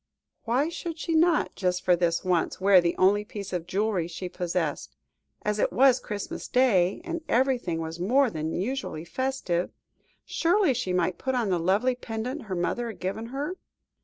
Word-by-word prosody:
Why 250 +6 +2
should 335 0 -5
she 330 +1 -2
not, 325 0 +3
just 180 -1 -1
for 180 - +5
this 170 0 0
once, 180 -2 0
wear 190 -1 +6
the 170 0 -1
only 200 +3 +4
piece 205 -4 -7
of 175 -2 -3
jewellery 195 -2 0
she 180 +2 -6
possessed? 175 -4 -3 0.5
As 210 0 -1
it - - +2
was 260 -1 +5
Christmas 205 -4 -5
Day, 205 - +3
and 335 -1 -4
everything 245 - +1
was 165 +1 -5
more 250 +7 +3
than 155 0 -3
usually 195 -5 -3
festive, 185 -5 -1 0.6
surely 350 -2 +2
she 230 -6 -2
might 180 0 0
put 260 0 -1
on 235 -5 0
the 180 - +2
lovely 200 +9 +2
pendant 245 +3 -5
her 190 -3 -4
mother 205 +7 -1
had 225 - -8
given 200 +5 -3
her? 285 +9 -4
205 Hz, 175 wpm, -27 LUFS, 180-260 Hz, 0.6 s, wear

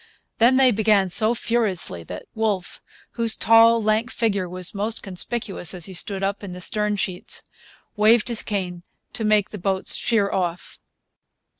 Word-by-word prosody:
Then 240 +3 +5
they 265 -1 +5
began 210 -3 +2
so 220 +5 +4
furiously 210 - 0
that 90 - -9
Wolfe, 210 -5 -3 0.3
whose 230 -2 +1
tall, 230 +1 +5
lank 215 +3 0
figure 200 -7 -1
was 180 0 -4
most 215 +2 -2
conspicuous 195 -1 -3
as 175 -2 -3
he 190 - -6
stood 195 +2 -1
up 200 +1 -2
in 190 -3 -7
the 180 - -9
stern 210 +3 0
sheets, 185 -2 -4 0.5
waved 215 +2 +3
his 235 -2 +3
cane 185 -4 -4 0.3
to 225 - -4
make 215 -1 +2
the 210 - -8
boats 190 +1 +1
sheer 210 -4 0
off. 175 -2 -4
210 Hz, 160 wpm, -22 LUFS, 185-225 Hz, 0.5 s, Then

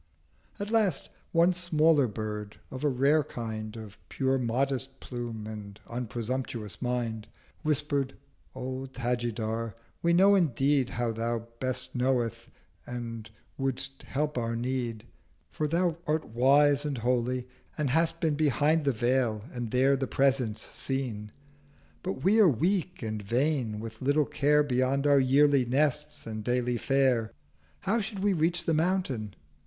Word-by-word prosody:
At 205 +1 -4
last 210 -10 +2 0.2
one 170 +2 +4
smaller 160 -5 +3
Bird, 105 -1 -5
of 130 +2 -6
a 150 - +3
rare 140 +4 +3
kind, 110 -3 -6
Of 110 -2 -10 0.2
modest 135 +1 0
Plume 120 -3 -6
and 105 -2 -8
unpresumptuous 120 -2 -4
Mind, 120 -3 -2 0.3
Whisper'd 145 -3 0 0.4
'O 130 +1 -4
Tajidar, 115 -3 -2 0.3
we 170 - +2
know 190 +4 +6
indeed 140 -6 +2
How 120 -1 -1
Thou 115 0 -2
both 130 -1 -2
knowest, 125 -2 0 0.4
and 115 -2 -6 0.3
would'st 135 0 -2
help 150 -1 -1
our 115 0 -2
Need; 120 -2 -2 0.5
For 155 - -1
thou 170 +1 +1
art 155 +1 +1
wise 140 +5 +4
and 145 -3 -2
holy, 125 +1 0 0.3
and 150 -4 0
hast 165 +3 +2
been 160 -3 +1
Behind 150 +1 +2
the 140 - +4
Veil, 120 -2 +1
and 120 -2 -4
there 130 +3 +4
The 135 -1 -2
Presence 130 -6 +1
seen. 120 -6 -4 0.7
But 180 -8 -4
we 205 +5 +4
are 205 -5 +8
weak 180 - 0
and 110 -1 -3
vain, 120 0 0
with 110 0 -8
little 145 +3 +3
care 150 +2 +3
550 135 -4 -2
Beyond 130 +2 +1
our 145 -1 +6
yearly 140 +1 +4
Nests 150 +3 0
and 110 -1 -5
daily 125 +1 0
Fare— 130 -3 +2 0.5
How 205 +5 +1
should 200 -2 -5
we 205 -1 +3
reach 170 +1 +1
the 165 - +2
Mountain? 155 - 0
130 Hz, 140 wpm, -29 LUFS, 115-150 Hz, 0.7 s, are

